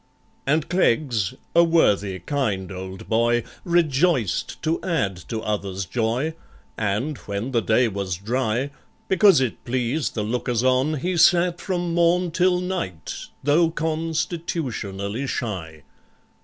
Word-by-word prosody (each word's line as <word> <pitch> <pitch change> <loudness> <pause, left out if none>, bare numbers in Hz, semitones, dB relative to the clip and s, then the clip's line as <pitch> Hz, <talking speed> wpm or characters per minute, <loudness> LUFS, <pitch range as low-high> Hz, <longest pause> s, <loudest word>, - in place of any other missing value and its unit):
And 150 +2 +2
CLEGGS—a 130 - +1
worthy 105 - +2
kind 100 - -2
old 95 0 -7
boy— 115 +1 +2 0.2
Rejoiced 160 - +1
to 160 +1 0
add 110 - 0
to 115 -2 -2
others' 100 -2 -2
joy, 120 - -1 0.4
And, 110 +8 -1
when 100 +6 -2
the 120 -3 +2
day 115 +3 +3
was 100 -3 -3
dry, 120 +5 -1 0.4
Because 190 -3 +6
it 130 -4 -2
pleased 130 +4 -1
the 105 - -1
lookers 120 +1 -1
on, 130 +4 +2
He 175 +5 -2
sat 175 +1 +4
from 175 -3 -2
morn 170 +1 +3
till 180 +1 +3
night—though 160 - -1
con 160 0 -2
Stitutionally 130 - -3
shy. 85 - -4
130 Hz, 120 wpm, -23 LUFS, 105-165 Hz, 0.4 s, Because